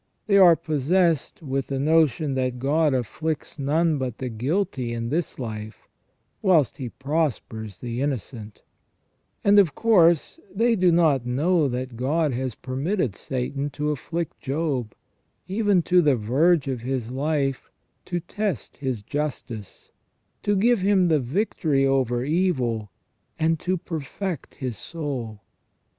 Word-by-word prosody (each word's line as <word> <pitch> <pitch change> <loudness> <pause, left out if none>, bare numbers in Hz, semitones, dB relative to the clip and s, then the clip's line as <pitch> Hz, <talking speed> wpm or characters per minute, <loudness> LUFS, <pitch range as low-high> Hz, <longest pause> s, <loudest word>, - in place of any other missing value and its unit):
They 200 -2 +4
are 175 -3 +8
possessed 160 +1 0
with 135 -2 -2
the 135 - -2
notion 155 0 +2
that 130 -1 -1
God 150 +4 +2
afflicts 150 +5 -3
none 155 +2 +1
but 125 -3 -3
the 130 - -4
guilty 130 - -1
in 115 0 -3
this 165 +4 -2
life, 110 -3 -7 0.5
whilst 160 - +3
He 130 -5 -5
prospers 130 - -3
the 120 0 -3
innocent; 120 -6 -4 0.8
and 205 0 +6
of 170 -8 +3
course 175 - +3
they 230 +4 +2
do 185 -3 +4
not 155 -7 +3
know 155 +5 +2
that 125 -1 -4
God 145 +3 +1
has 125 -2 -3
permitted 135 - -2
Satan 135 +4 -3
to 150 0 0
afflict 165 +3 -4
Job, 135 -6 -2 0.5
even 200 -2 +2
to 180 +2 +4
the 145 -5 +4
verge 140 +8 +2
of 130 -3 -2
his 125 -1 -3
life, 135 -1 -1 0.4
to 175 -1 -2
test 185 - -4
his 130 -7 -3
justice, 125 -6 -5 0.5
to 205 - +1
give 230 +4 +3
him 190 -2 +3
the 155 -2 +4
victory 140 - 0
over 130 -2 +1
evil, 130 - 0 0.5
and 160 0 +1
to 185 +4 -1
perfect 165 +1 -5
his 125 -3 -4
soul. 130 -10 -5
145 Hz, 135 wpm, -24 LUFS, 125-170 Hz, 0.8 s, are